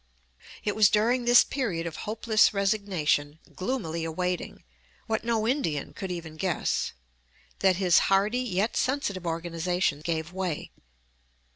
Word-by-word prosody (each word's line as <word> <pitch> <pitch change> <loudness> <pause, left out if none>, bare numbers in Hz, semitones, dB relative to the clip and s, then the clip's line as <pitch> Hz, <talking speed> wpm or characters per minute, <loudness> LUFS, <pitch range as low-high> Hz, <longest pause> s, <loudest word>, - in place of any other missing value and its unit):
It 205 - -1
was 210 -3 +6
during 235 +4 +2
this 240 0 +7
period 200 -12 -2
of 165 -2 -5
hopeless 215 -1 +3
resignation, 190 -8 0 0.2
gloomily 185 -6 -3
awaiting 180 +2 -3 0.4
what, 220 -1 -1
no 225 -2 0
Indian 170 - -1
could 190 - -6
even 160 -3 -6
guess 185 0 -1 0.7
that 190 -1 +4
his 180 -2 +4
hardy, 200 +5 +3
yet 215 -3 -1
sensitive, 205 -10 -1
organization 170 -1 -1
gave 165 0 -3
way. 185 -5 -3
190 Hz, 125 wpm, -27 LUFS, 165-220 Hz, 0.7 s, this